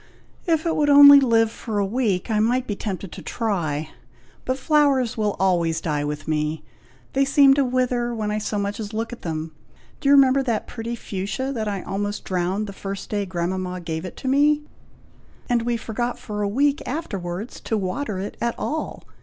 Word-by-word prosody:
"If 325 -1 +2
it 330 - +1
would 295 -1 +2
only 285 0 +10
live 225 -4 +3
for 220 -3 -5
a 200 - +2
week, 210 -3 -1
I 215 - +2
might 245 +4 +2
be 205 - -3
tempted 195 -3 -5
to - - -9
try; 160 -9 -2 0.6
but 255 0 -1
flowers 275 -4 +2
will 210 -2 0
always 170 -4 +2
die 150 -3 -1
with 150 +1 -4
me. 155 0 -1 0.5
They 275 - +3
seem 275 0 +6
to 280 0 +3
wither 250 -1 0
when 215 -3 -2
I 210 - -1
so 210 0 -3
much 200 +1 -2
as 210 -1 -6
look 225 +2 -3
at 240 - -10
them. 160 -1 -4 0.5
Do 275 - 0
you - - +7
remember 275 0 +5
that 235 -5 -1
pretty 235 0 -5
fuchsia 215 +6 -4
that 220 -4 -3
I 200 -2 -3
almost 205 +1 -3
drowned 185 +3 -1
the 200 - -7
first 195 0 -6
day 205 -2 -1
grandmama 180 +1 -3
gave 160 -1 -4
it 185 - -8
me; 290 +3 +3 0.8
and 240 -2 +2
we 235 0 -1
forgot 240 +2 -3
for 210 -4 -5
a 200 - 0
week 285 +7 +2
afterwards 205 - -4
to 220 - -2
water 205 +3 -3
it 195 +2 -5
at 235 0 0
all. 315 +1 -4
220 Hz, 195 wpm, -23 LUFS, 190-255 Hz, 0.8 s, only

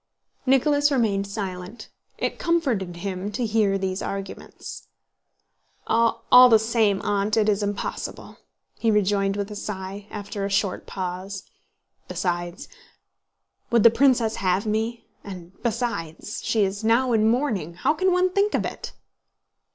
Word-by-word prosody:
Nicholas 290 +2 +3
remained 210 -7 +1
silent. 195 0 -6 0.3
It - - -2
comforted 255 - 0
him 190 +2 -4
to 245 +1 -1
hear 210 -3 +2
these 190 0 -2
arguments. 195 0 -7 1.0
"All 230 0 +1 0.3
the 225 - +7
same, 220 -3 +1
Aunt, 205 +1 0
it 215 -1 +3
is 210 -1 +2
impossible," 205 0 -4 0.4
he 230 - +1
rejoined 200 -1 +2
with 200 +1 -3
a - - -6
sigh, 200 0 -6
after 205 -1 -5
a 200 - -1
short 195 -1 -1
pause. 185 +1 -5 0.6
"Besides, 175 0 -3 1.0
would 235 -3 +3
the 230 - +8
princess 240 -4 +3
have 185 +1 +1
me? 220 +2 -2 0.2
And 180 -3 -9
besides, 220 -7 -3
she 220 -2 +2
is 200 +2 -2
now 235 +3 +3
in 220 0 +4
mourning. 225 - -1
How 175 - +1
can 370 +4 +1
one 360 +1 +2
think 400 +2 +2
of - - 0
it!" - - -6
210 Hz, 135 wpm, -24 LUFS, 195-235 Hz, 1.0 s, the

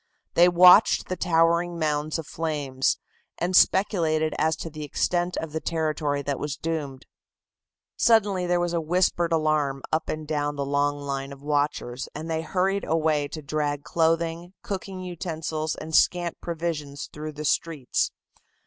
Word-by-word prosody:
They 175 +1 +6
watched 180 +1 +6
the 185 - -1
towering 170 0 +2
mounds 155 -1 -1
of 165 - -6
flames, 145 -5 -1 0.4
and 180 +2 -1
speculated 160 -6 +3
as 160 0 +2
to 165 - -7
the 155 0 -7
extent 175 +4 -1
of 160 -1 -4
the 160 - -2
territory 155 -3 -1
that 140 0 -2
was 145 -2 -3
doomed. 145 -5 -4 0.9
Suddenly 205 -6 +3
there 175 0 +2
was 175 0 -1
whispered 170 +1 +1
alarm 155 -4 +1
up 160 - 0
and 155 -1 -4
down 145 -1 -1
the 140 -1 -2
long 145 +1 +1
line 140 -1 -4
of 140 0 -11
watchers, 145 -3 -1
and 160 +2 -5
they 160 0 0
hurried 190 +4 0
away 155 -2 +1
to 155 +1 -8
drag 145 0 -2
clothing, 165 +2 0
cooking 190 -1 -5
utensils 160 -3 -3
and 160 +1 -8
scant 175 -1 +2
provisions 160 -4 -4
through 155 0 -6
the 150 +1 -6
streets. 150 -5 0
160 Hz, 150 wpm, -25 LUFS, 145-170 Hz, 0.9 s, They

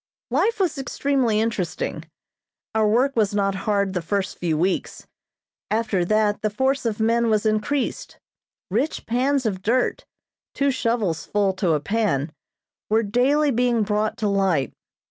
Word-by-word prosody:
Life 405 - +1
was 340 -7 0
extremely 265 -4 0
interesting. 220 -6 -2 0.7
Our 220 -1 +2
work 255 +6 +2
was 210 -3 +1
not 195 -1 +1 0.2
hard 200 -2 +1
the 180 - -1
first 190 +3 -2
few 165 -3 0
weeks; 180 +4 -1 0.6
after 215 -4 0
that 215 +1 +1
the 215 - +1
force 265 +4 0
of 220 -1 -3
men 230 +1 +2
was 215 0 +1
increased. 215 +6 -1 0.5
Rich 255 +10 -1
pans 260 +3 +1
of 190 -4 -1
dirt 240 +5 0 0.5
(two 280 0 +2
shovels 230 - -1
full 200 -2 +1
to 185 -3 +1
a 150 - +1
pan) 170 -5 0 0.6
were 220 +2 +3
daily 270 +8 +2
being 240 -2 +2
brought 210 +1 -1
to 215 - -1
light. 195 -8 +1
215 Hz, 145 wpm, -23 LUFS, 200-250 Hz, 0.7 s, were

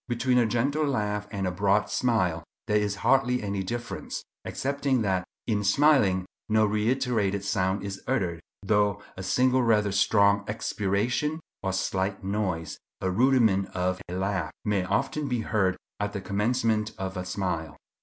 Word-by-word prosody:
Between 125 +1 +2
a 120 - +3
gentle 135 +7 +1
laugh 105 -5 -1
and 100 -3 -3
a 90 - 0
broad 100 +3 +2
smile 90 -9 +1 0.2
there 105 -1 +2
is 105 -1 -1
hardly 125 -3 +3
any 100 -1 -2
difference, 120 +6 -5 0.2
excepting 140 -3 -1
that 95 -2 +1 0.2
in 105 -3 0
smiling 100 -5 +4 0.2
no 110 0 +4
reiterated 105 -2 0
sound 100 -1 0
is 100 -1 -5
uttered, 95 -11 0 0.2
though 100 0 +1
a 95 - -7
single 125 +7 +2
rather 105 -4 +3
strong 100 0 +3
expiration, 110 +8 -1 0.2
or 95 - -1
slight 95 +1 -1
noise—a 95 -2 -3
rudiment 110 -3 +3
of 90 +1 -1
a 90 - -4
laugh—may 95 +1 -1
often 135 +9 -1
be 125 -3 -1
heard 95 -4 +1 0.2
at 105 0 -2
the 100 - -4
commencement 110 +1 0
of 95 0 -4
a 90 - -3
smile. 90 -5 -3
105 Hz, 145 wpm, -27 LUFS, 95-120 Hz, 0.2 s, smiling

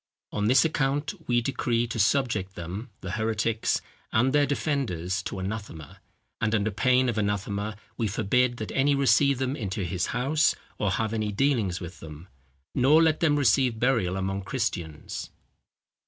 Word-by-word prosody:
On 105 0 0
this 130 +6 +5
account 145 0 0
we 120 -1 +3
decree 120 -2 0
to 115 -1 -5
subject 110 -5 +1
them 95 +9 -6
(the 90 - -5
heretics) 110 +1 0 0.3
and 125 +5 +2
their 145 -1 +4
defenders 105 - -1
to 100 - -5
anathema: 95 -6 -6 0.4
and, 110 -1 +2
under 105 0 +1
pain 130 +4 +3
of 115 -3 0
anathema, 100 +1 -2 0.2
we 115 - 0
forbid 120 +5 +1
that 110 - -5
any 140 +1 +2
receive 140 +1 +4
them 130 +1 -1
into 100 -7 -3
his 90 0 -1
house, 140 +6 +2 0.2
or 105 - +1
have 110 +2 -1
any 110 -2 -1
dealings 110 -6 +1
with 90 0 -8
them. 80 +3 -11 0.4
Nor 145 +6 +5
let 160 -1 +2
them 155 -3 +3
receive 130 -3 +3
burial 115 -8 +1
among 95 +1 -2
Christians." 90 - -4
110 Hz, 155 wpm, -27 LUFS, 100-130 Hz, 0.4 s, this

